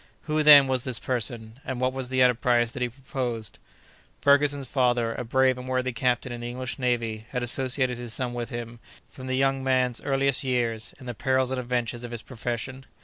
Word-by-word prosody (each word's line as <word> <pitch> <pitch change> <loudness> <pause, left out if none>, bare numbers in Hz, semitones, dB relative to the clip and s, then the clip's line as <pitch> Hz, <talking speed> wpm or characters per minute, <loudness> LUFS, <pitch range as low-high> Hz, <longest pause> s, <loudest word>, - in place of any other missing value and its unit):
Who, 155 -1 0
then, 145 -2 +9
was 130 -2 0
this 130 -3 -1
person, 115 -1 -3
and 130 -2 -4
what 130 0 +1
was 130 -1 -4
the 130 -1 +3
enterprise 120 -1 +3
that 130 - -7
he 125 - +1
proposed? 120 -4 -5 0.6
Ferguson's 140 -1 +3
father, 120 -3 +1
a - - -4
brave 130 +2 +2
and 125 - -8
worthy 130 0 0
captain 125 +1 0
in 120 0 -6
the 120 - -4
English 130 +3 -5
Navy, 115 -3 -1
had 125 -2 -3
associated 130 0 +1
his 120 -2 -5
son 125 0 -2
with 120 -1 -4
him, 120 -1 -6 0.3
from 130 -1 -10
the 130 0 -1
young 135 0 +1
man's 130 -2 +1
earliest 135 -1 +2
years, 120 -4 -1
in 130 - -12
the 120 - -4
perils 130 +2 0
and 130 - -1
adventures 120 -1 -2
of 120 - -6
his 120 -1 -5
profession. 130 +2 -5
125 Hz, 205 wpm, -26 LUFS, 120-130 Hz, 0.6 s, then